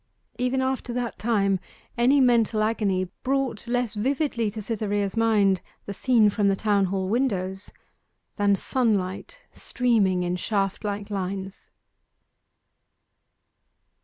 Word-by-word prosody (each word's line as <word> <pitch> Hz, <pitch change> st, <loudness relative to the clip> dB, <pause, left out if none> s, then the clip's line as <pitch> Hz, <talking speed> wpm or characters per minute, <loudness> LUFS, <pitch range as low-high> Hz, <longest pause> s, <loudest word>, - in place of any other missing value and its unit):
Even 255 Hz, +1 st, +1 dB
after 260 Hz, -2 st, -2 dB
that 245 Hz, -1 st, -3 dB
time 200 Hz, -4 st, +1 dB, 0.4 s
any 250 Hz, +4 st, +4 dB
mental 230 Hz, -4 st, +3 dB
agony 200 Hz, -4 st, 0 dB
brought 265 Hz, -4 st, -1 dB
less 245 Hz, -2 st, 0 dB
vividly 245 Hz, 0 st, 0 dB
to 215 Hz, +2 st, -7 dB
Cytherea's 205 Hz, -2 st, -2 dB
mind 210 Hz, -5 st, +3 dB, 0.2 s
the 200 Hz, -, -5 dB
scene 225 Hz, -1 st, +3 dB
from 205 Hz, -1 st, +1 dB
the 195 Hz, -, +3 dB
Town 200 Hz, -1 st, +2 dB
Hall 190 Hz, 0 st, -2 dB
windows 195 Hz, -5 st, -1 dB, 0.6 s
than 205 Hz, -1 st, +3 dB
sunlight 215 Hz, -, -1 dB
streaming 210 Hz, -8 st, +1 dB
in 180 Hz, 0 st, -1 dB
shaft 195 Hz, +1 st, -1 dB
like 205 Hz, 0 st, -4 dB
lines. 195 Hz, 0 st, -5 dB
210 Hz, 115 wpm, -25 LUFS, 195-240 Hz, 0.6 s, any